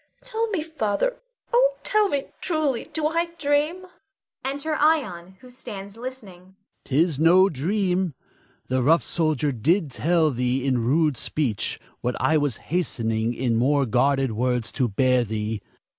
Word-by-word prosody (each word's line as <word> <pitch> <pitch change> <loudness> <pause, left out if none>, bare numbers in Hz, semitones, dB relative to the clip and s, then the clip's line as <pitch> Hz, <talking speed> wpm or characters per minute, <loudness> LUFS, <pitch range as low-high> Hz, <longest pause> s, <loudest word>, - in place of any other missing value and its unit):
Tell 460 -2 -1
me, 375 -8 -1
Father, 315 - -1 0.4
oh, - - +4
tell 425 -1 +3
me 280 -4 0 0.2
truly, 310 -8 0
do 315 -2 -2
I 335 +2 0
dream? 300 +4 0 0.6
[Enter 285 +4 -2
Ion, 215 - +1
who 255 - -14
stands 200 -5 -8
listening. 200 -7 -9
Adrastus. 200 +1 -49
'Tis 150 +1 +1
no 180 +4 +6
dream. 180 +2 0 0.5
The 130 0 0
rough 160 +7 +4
soldier 155 -4 0
did 155 - +1
but 125 - -12
tell 165 -2 +3
thee 125 +1 -1
in 130 -4 +1
rude 150 +2 +2
speech, 120 -11 -2 0.2
what 125 0 -2
I 160 - +2
was 145 -6 +1 0.2
hastening 115 -9 -1
in 120 -2 0
more 140 +3 +3
guarded 135 +2 +2
words 125 +1 -1
to 130 -3 0
bear 125 +3 +2
thee. 110 -1 -3
170 Hz, 150 wpm, -24 LUFS, -, 0.6 s, no